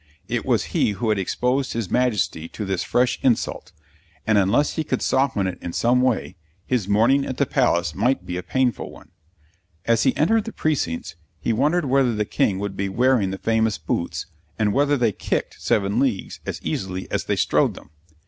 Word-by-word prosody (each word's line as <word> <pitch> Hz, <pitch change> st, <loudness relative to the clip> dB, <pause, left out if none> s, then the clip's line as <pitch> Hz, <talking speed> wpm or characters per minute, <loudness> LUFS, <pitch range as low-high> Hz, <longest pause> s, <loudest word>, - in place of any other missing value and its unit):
It -, -, -2 dB
was -, -, +2 dB
he 105 Hz, -, +2 dB
who 110 Hz, +3 st, -2 dB
had 105 Hz, -2 st, +2 dB
exposed 125 Hz, +7 st, 0 dB
his 115 Hz, -5 st, -3 dB
Majesty 110 Hz, -10 st, 0 dB
to 105 Hz, -, -6 dB
this 95 Hz, -2 st, -1 dB
fresh 125 Hz, 0 st, +1 dB
insult; 115 Hz, -6 st, 0 dB, 0.5 s
and, 110 Hz, -, +2 dB
unless 100 Hz, +10 st, +2 dB
he 160 Hz, -, -1 dB
could 155 Hz, -, -2 dB
soften 130 Hz, -7 st, +1 dB
it 95 Hz, -1 st, -3 dB
in 85 Hz, -, -5 dB
some 125 Hz, +2 st, +2 dB
way, 115 Hz, -7 st, 0 dB, 0.3 s
his 120 Hz, -7 st, -1 dB
morning 115 Hz, +7 st, +3 dB
at 130 Hz, -2 st, -4 dB
the 140 Hz, -, +2 dB
Palace 85 Hz, -, +1 dB
might 125 Hz, +7 st, 0 dB
be 90 Hz, -, -4 dB
a 90 Hz, -, -2 dB
painful 130 Hz, +4 st, -1 dB
one. -, -, -15 dB, 0.7 s
As 115 Hz, -1 st, +3 dB
he 130 Hz, -, +2 dB
entered 220 Hz, +7 st, +2 dB
the 225 Hz, -, -6 dB
precincts, 85 Hz, -, -2 dB, 0.2 s
he 115 Hz, -, 0 dB
wondered 150 Hz, +8 st, +2 dB
whether 130 Hz, -3 st, +2 dB
the 105 Hz, 0 st, 0 dB
King 100 Hz, -1 st, +1 dB
would 100 Hz, 0 st, -4 dB
be 100 Hz, 0 st, -2 dB
wearing 120 Hz, -1 st, +2 dB
the 95 Hz, -, -4 dB
famous 110 Hz, 0 st, +1 dB
boots, 80 Hz, +2 st, -3 dB, 0.3 s
and 105 Hz, -2 st, +1 dB
whether 145 Hz, +1 st, +2 dB
they 120 Hz, -4 st, +2 dB
kicked -, -, -3 dB
seven 100 Hz, +2 st, +1 dB
leagues 130 Hz, -8 st, -1 dB
as -, -, -3 dB
easily 95 Hz, -1 st, -3 dB
as -, -, -1 dB
they -, -, 0 dB
strode -, -, +2 dB
them. -, -, -14 dB
115 Hz, 195 wpm, -23 LUFS, 95-130 Hz, 0.7 s, morning